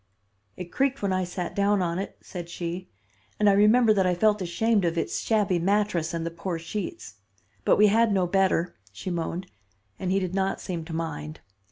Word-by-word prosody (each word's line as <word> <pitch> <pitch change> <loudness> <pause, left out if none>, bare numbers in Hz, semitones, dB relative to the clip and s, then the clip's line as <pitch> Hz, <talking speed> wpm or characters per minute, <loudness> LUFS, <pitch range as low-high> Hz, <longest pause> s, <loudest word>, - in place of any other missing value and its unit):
"'It 180 -1 -7
creaked 275 -2 0
when 195 -2 +1
I 185 0 +1
sat 180 0 -5
down 200 0 +2
on 170 +1 -1
it,' 195 - -5
said 175 -2 -8
she, 175 +1 -5 0.5
'and 210 - +4
I 200 - +6
remember 215 +3 +5
that 190 -3 +2
I 180 - +2
felt 210 +2 +2
ashamed 205 +4 +1
of 170 -1 0
its - - -1
shabby 205 -5 +1
mattress 190 -3 +1
and 165 -1 -3
the 165 - -3
poor 170 +1 -4
sheets. 165 - -6 0.5
But - - +4
we 210 - +6
had 220 +2 +4
no 190 -2 +2
better,' 180 -1 +1 0.2
she 110 - -6
moaned, 175 +1 -3 0.5
'and 185 - -2
he 195 - +3
did 185 -2 -3
not 195 0 0
seem 170 -3 -4
to 165 - -7
mind. 85 - -5
185 Hz, 200 wpm, -26 LUFS, 170-205 Hz, 0.5 s, I